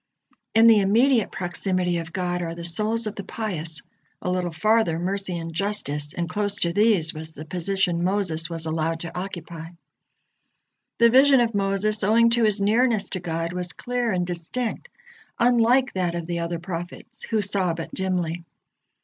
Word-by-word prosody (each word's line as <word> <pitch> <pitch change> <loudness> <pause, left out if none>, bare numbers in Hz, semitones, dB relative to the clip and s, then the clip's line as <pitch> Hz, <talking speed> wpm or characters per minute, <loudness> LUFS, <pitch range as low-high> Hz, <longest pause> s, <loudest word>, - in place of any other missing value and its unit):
In 225 +1 +7
the 225 -2 +7
immediate 230 +4 +3
proximity 180 0 -1
of 165 -1 -7
God 180 0 -2
are 165 -1 -4
the 170 - -7
souls 215 +6 0
of 215 - -3
the 200 - -7
pious, 170 -9 -2 0.4
a 180 - -2
little 180 -1 -1
farther 215 -1 +2
Mercy 185 +1 -2
and 165 0 -6
Justice, 155 -6 -2
and 170 -1 -2
close 205 +3 0
to 170 0 +1
these 205 -6 +3
was 160 0 -8
the 155 - -8
position 180 0 -1
Moses 180 -4 0
was 165 -1 -5
allowed 160 +1 -1
to 170 - -7
occupy. 175 -3 -6 1.3
The 235 0 +5
vision 270 +1 +6
of 235 -1 +1
Moses, 200 +2 0
owing 230 +3 +4
to 235 -1 +3
his 210 -1 +1
nearness 220 +1 +2
to 185 - -2
God, 165 -1 -3
was 180 0 -3
clear 245 -2 -2
and 180 -2 0
distinct, 200 - -4 0.5
unlike 245 +2 +3
that 180 -2 -1
of 170 -1 -4
the 170 0 -3
other 170 0 -2
prophets, 175 +6 -7
who 220 -2 0
saw 190 -4 0
but 165 - -7
dimly. 175 -3 -2
185 Hz, 170 wpm, -24 LUFS, 170-215 Hz, 1.3 s, In